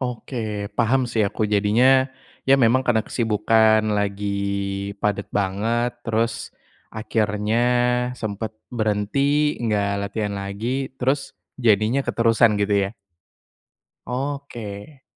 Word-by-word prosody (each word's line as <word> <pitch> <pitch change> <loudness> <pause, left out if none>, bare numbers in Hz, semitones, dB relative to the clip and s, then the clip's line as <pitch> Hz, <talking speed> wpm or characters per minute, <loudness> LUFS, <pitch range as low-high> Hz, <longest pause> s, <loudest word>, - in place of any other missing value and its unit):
Oke, 110 -4 -4
paham 125 +3 +3
sih 110 -2 +1
aku 110 - -4
jadinya. 125 +6 +4 0.4
Ya, 135 - +7
memang 120 +3 +4
karena 110 -3 +3
kesibukan 110 -1 +3
lagi 100 0 -1 0.7
padat 100 -1 0
banget, 110 +5 0 0.2
terus 115 0 -1 0.4
akhirnya 110 0 -1 0.6
sempat 110 -1 -5 0.2
berhenti, 130 +7 +1
enggak 105 -3 0
latihan 105 0 -3
lagi. 115 +8 -3
Terus 135 +3 -1 0.2
jadinya 110 +2 +3
keterusan 115 -1 +3
gitu, 100 0 +1
ya? - - -6 1.2
Oke. 130 -2 -6
110 Hz, 100 wpm, -22 LUFS, 105-125 Hz, 1.2 s, Ya